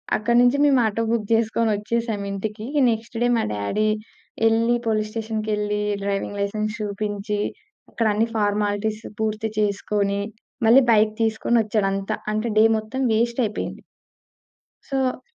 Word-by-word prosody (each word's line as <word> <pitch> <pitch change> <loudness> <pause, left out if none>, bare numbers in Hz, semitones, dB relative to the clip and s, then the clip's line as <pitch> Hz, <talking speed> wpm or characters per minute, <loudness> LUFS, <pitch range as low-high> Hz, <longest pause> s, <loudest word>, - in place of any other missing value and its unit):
అక్కడ 230 +3 0
నుంచి 245 +3 +4
మేము 280 -3 +5
ఆటో 220 +1 0
బుక్ 230 -2 0
చేసుకొని 225 0 +1
వచ్చేసాం 220 0 -2
ఇంటికి. 210 +2 -4
ఇగ 295 -1 +2
నెక్స్ట్ 225 +1 -5
డే 240 - +3
మా 225 - +1
డ్యాడీ 105 - 0 0.6
ఎళ్లి 230 +2 +3
పోలీస్ 215 -1 0
స్టేషన్‌కెళ్లి 215 -2 -2 0.2
డ్రైవింగ్ 200 0 -2
లైసెన్స్ 215 +2 -2
చూపించి, 205 0 -3 0.5
అక్కడన్ని 220 0 +1
ఫార్మాలిటీస్ 210 +1 0 0.2
పూర్తి 220 0 -1
చేసుకొని 200 -1 0 0.5
మళ్ళి 245 +4 +8
బైక్ 215 -1 +4
తీసుకొని 225 +1 +1
వచ్చాడు 210 -2 0
అంతా. 195 +2 -2 0.2
అంటే 215 +2 -1
డే - - +7
మొత్తం 220 +5 -4
వేస్టయిపోయింది. 235 0 -1 1.1
సో 265 -2 -1
215 Hz, 130 wpm, -23 LUFS, 210-230 Hz, 1.1 s, మళ్ళి